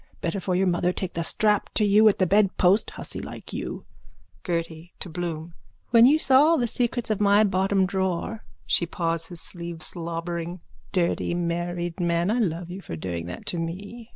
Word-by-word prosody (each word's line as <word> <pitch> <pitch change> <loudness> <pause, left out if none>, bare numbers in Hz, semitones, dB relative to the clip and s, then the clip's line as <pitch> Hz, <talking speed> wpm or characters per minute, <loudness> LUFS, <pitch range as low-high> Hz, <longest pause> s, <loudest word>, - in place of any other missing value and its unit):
Better 170 +4 -2
for 185 0 -1
your 190 +2 +2
mother 175 0 +1
take 185 0 -4
the 170 - -2
strap 210 +4 +1
to 215 - +3
you 210 +2 +6
at 200 - 0
the 185 - +3
bedpost, 195 0 +3
hussy - - -7
like - - -9
you. - - -5 0.6
GERTY: 165 -1 -4
(To 180 - -5
Bloom.) 170 -1 -5 0.4
When 235 0 +8
you 295 +3 +5
saw 270 -3 +5
all 325 +2 +5
the 245 - +1
secrets 240 0 -1
of 210 - -1
my 205 +1 +5
bottom 195 -1 +2
drawer. 190 +3 -2 0.2
(She 170 - +2
paws 165 -1 -1
his 175 -2 -1
sleeve, 170 -2 -4
slobbering.) 170 0 -3 0.3
Dirty 175 -1 0
married 175 0 -2
man! 170 +2 +1
I 240 - +1
love 175 -4 -1
you 190 +2 -7
for 80 - -7
doing 85 0 -4
that 90 - -8
to 175 - -3
me. 200 +8 -6
180 Hz, 185 wpm, -25 LUFS, 170-205 Hz, 0.6 s, When